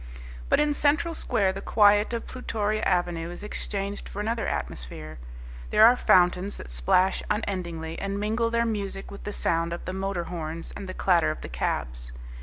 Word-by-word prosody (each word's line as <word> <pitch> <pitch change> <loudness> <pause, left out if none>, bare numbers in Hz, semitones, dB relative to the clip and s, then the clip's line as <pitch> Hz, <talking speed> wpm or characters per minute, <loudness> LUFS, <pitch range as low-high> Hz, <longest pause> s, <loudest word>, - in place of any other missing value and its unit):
But - - +4
in 295 0 +3
Central 300 +4 +2
Square 195 -10 +1
the 195 - -6
quiet 205 +1 +4
of 235 -1 -3
Plutoria 215 -4 -2
Avenue 175 -4 0
is 175 +3 -8
exchanged 200 -1 -4
for 200 - -7
another 225 +2 -1
atmosphere. 60 +3 -5 0.5
There 220 - +7
are 240 +2 +7
fountains 180 -2 +3
that 60 - -9
splash 180 - +2
unendingly 175 -6 -3
and 200 0 -3
mingle 225 +3 0
their 235 0 +1
music 200 -3 -3
with 200 - -10
the 205 - -3
sound 170 -3 0
of 170 - -6
the 185 - -4
motor 190 -2 -2
horns 165 -1 -6
and 195 - -7
the 185 - -6
clatter 175 -4 +3
of 155 - -4
the - - -7
cabs. - - -3
195 Hz, 180 wpm, -26 LUFS, 170-210 Hz, 0.5 s, There